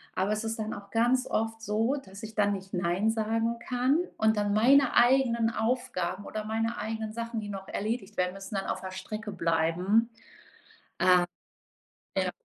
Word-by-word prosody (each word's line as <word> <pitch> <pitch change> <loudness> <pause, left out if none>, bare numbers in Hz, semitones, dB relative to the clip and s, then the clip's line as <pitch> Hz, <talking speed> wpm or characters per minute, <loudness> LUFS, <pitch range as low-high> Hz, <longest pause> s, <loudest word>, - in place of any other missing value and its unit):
aber 195 +3 +1
es 215 +1 -2
ist 225 0 -3
dann 215 0 -3
auch 200 0 -10
ganz 245 +3 +3
oft 225 0 -1
so, 225 +5 +1
dass 195 +1 -11
ich 220 0 -7
dann 205 -1 +3
nicht 190 0 -7
Nein 180 +4 +1
sagen 225 +1 0
kann 255 +5 +2 0.2
und 220 0 +3
dann 205 0 +1
meine 260 +4 +5
eigenen 240 -2 +4
Aufgaben 220 -6 -1
oder 215 0 -4
meine 225 +2 -1
eigenen 220 0 -4
Sachen, 230 0 -3
die 210 - -6
noch 195 -1 -6
erledigt 215 -1 -3
werden, 180 +1 0
dann 195 -1 -2
auf - - -2
der 190 0 -6
Strecke 210 +3 -6
bleiben. 180 +6 +2 2.1
Ähm. - - +3
Ja. - - 0
220 Hz, 170 wpm, -29 LUFS, 195-230 Hz, 2.1 s, meine